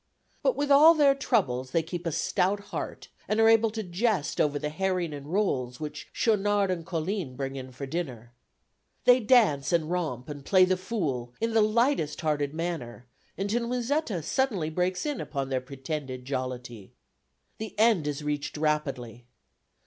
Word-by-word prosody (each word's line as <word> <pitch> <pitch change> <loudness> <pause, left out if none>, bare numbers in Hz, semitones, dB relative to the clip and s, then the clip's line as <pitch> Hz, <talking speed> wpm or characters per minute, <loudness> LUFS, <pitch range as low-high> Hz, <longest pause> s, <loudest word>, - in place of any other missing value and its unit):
But - - +2
with 285 0 -1
all 310 +4 +8
their 285 -3 +5
troubles 175 - 0
they 160 +5 +1
keep 170 +1 -5
a - - 0
stout 190 +6 +1
heart - - -5 0.2
and 215 - 0
are 225 - +6
able 225 0 +5
to 220 0 -4
jest 185 -2 0
over 145 -1 +1
the 150 - -3
herring 180 -1 -1
and 140 -1 -8
rolls 140 -10 -1
which 150 -1 -7
Schaunard 205 -3 +2
and 170 -2 -3
Colline 165 -4 -3
bring 135 +1 -4
in 130 -1 -7
for 135 +2 -6
dinner. 130 -7 -5 0.7
They 250 0 +7
dance 210 - +3
and 170 -1 +1
romp, 150 -9 -2
and 145 -2 -7
play 185 +4 +5
the 185 0 +2
fool 150 - -3
in 230 0 -1
the 225 - +5
lightest 215 - +1
hearted 145 -3 0
manner 155 -8 -4 0.3
until 220 +5 -1
Musetta 245 - -1
suddenly 195 - 0
breaks 180 - -1
in 295 -3 -2
upon 140 -3 -4
their 130 -1 0
pretended 135 -1 -6
jollity. 125 -5 -5 0.7
The 220 0 -7
end 215 -8 +4
is 145 0 -3
reached 145 0 -3
rapidly. 135 -6 -2
165 Hz, 165 wpm, -28 LUFS, 140-215 Hz, 0.7 s, all